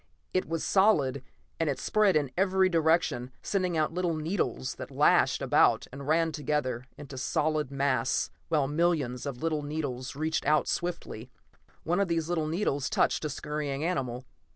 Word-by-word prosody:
It 185 Hz, -, 0 dB
was 165 Hz, -1 st, -2 dB
solid, 150 Hz, -10 st, +3 dB, 0.4 s
and 165 Hz, -2 st, +1 dB
it 140 Hz, -, -1 dB
spread 210 Hz, -4 st, +2 dB
in 145 Hz, -4 st, +1 dB
every 190 Hz, 0 st, +3 dB
direction, 160 Hz, -7 st, +1 dB
sending 185 Hz, -4 st, 0 dB
out 155 Hz, +1 st, +1 dB
little 175 Hz, -2 st, 0 dB
needles 155 Hz, -, -2 dB
that -, -, -7 dB
lashed -, -, +3 dB
about -, -, +4 dB
and 135 Hz, +1 st, -8 dB
ran 165 Hz, +1 st, +2 dB
together 140 Hz, -5 st, -2 dB
into 145 Hz, -2 st, -10 dB
a -, -, -7 dB
solid 150 Hz, +1 st, 0 dB
mass 135 Hz, -3 st, 0 dB, 0.2 s
while 150 Hz, -4 st, +1 dB
millions 150 Hz, -5 st, 0 dB
of 140 Hz, +1 st, -6 dB
little 155 Hz, -2 st, 0 dB
needles 140 Hz, -4 st, -4 dB
reached 155 Hz, +2 st, -1 dB
out 155 Hz, 0 st, +3 dB
swiftly. 170 Hz, -9 st, -3 dB, 0.5 s
One 175 Hz, +4 st, 0 dB
of 200 Hz, -, +2 dB
these 165 Hz, -1 st, -1 dB
little 160 Hz, -3 st, 0 dB
needles 155 Hz, -5 st, -1 dB
touched -, -, +1 dB
a -, -, -1 dB
scurrying 150 Hz, 0 st, -3 dB
animal. 130 Hz, -8 st, -2 dB
155 Hz, 165 wpm, -29 LUFS, 135-170 Hz, 0.5 s, about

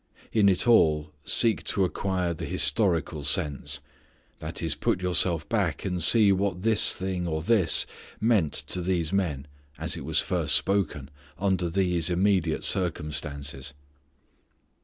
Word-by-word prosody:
In 105 Hz, -3 st, +3 dB
it 95 Hz, +4 st, +1 dB
all 75 Hz, -9 st, +3 dB
seek 115 Hz, +7 st, +3 dB
to 100 Hz, -, 0 dB
acquire 90 Hz, 0 st, -3 dB
the 80 Hz, -, -7 dB
historical 80 Hz, -1 st, +1 dB
sense. 75 Hz, -1 st, +2 dB, 0.6 s
That -, -, -5 dB
is, -, -, -1 dB
put -, -, -2 dB
yourself 90 Hz, -2 st, 0 dB
back 100 Hz, -10 st, -2 dB
and 90 Hz, -2 st, -3 dB
see 105 Hz, +3 st, +5 dB
what 95 Hz, -1 st, -2 dB
this 110 Hz, -2 st, +4 dB
thing, 95 Hz, -2 st, -4 dB
or 80 Hz, -1 st, -3 dB
this, 100 Hz, -3 st, +3 dB, 0.3 s
meant 105 Hz, -9 st, +1 dB, 0.2 s
to 90 Hz, -, 0 dB
these 90 Hz, -1 st, -2 dB
men, 80 Hz, -9 st, -2 dB, 0.3 s
as -, -, -1 dB
it -, -, -8 dB
was -, -, 0 dB
first -, -, +1 dB
spoken, 85 Hz, -8 st, -1 dB, 0.3 s
under 95 Hz, -3 st, -1 dB
these 90 Hz, -2 st, 0 dB
immediate 90 Hz, -3 st, 0 dB
circumstances. 75 Hz, -6 st, -2 dB
90 Hz, 135 wpm, -25 LUFS, 80-100 Hz, 0.6 s, see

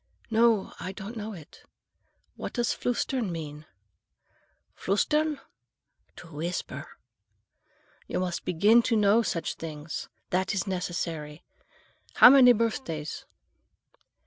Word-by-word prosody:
"No, 225 Hz, -2 st, +3 dB
I 185 Hz, -, -5 dB
don't 205 Hz, +3 st, -8 dB
know 220 Hz, 0 st, -5 dB
it. 160 Hz, -6 st, -13 dB, 0.7 s
What -, -, -6 dB
does 240 Hz, -1 st, 0 dB
flüstern 245 Hz, -2 st, -1 dB
mean?" 155 Hz, -2 st, -7 dB, 1.1 s
"Flüstern?—to 300 Hz, -, -3 dB
whisper. 155 Hz, -1 st, -4 dB, 1.2 s
You -, -, -2 dB
must 180 Hz, -2 st, -3 dB
begin 200 Hz, +7 st, +4 dB
now -, -, +1 dB
to 230 Hz, -, +2 dB
know 210 Hz, +1 st, +4 dB
such 165 Hz, -8 st, -2 dB
things. 155 Hz, -1 st, -7 dB, 0.2 s
That 190 Hz, +3 st, 0 dB
is 190 Hz, -, -1 dB
necessary. 170 Hz, -4 st, -4 dB, 0.7 s
How 245 Hz, -, +10 dB
many 260 Hz, -3 st, +8 dB
birthdays?" 215 Hz, -, -2 dB
190 Hz, 105 wpm, -27 LUFS, 165-230 Hz, 1.2 s, How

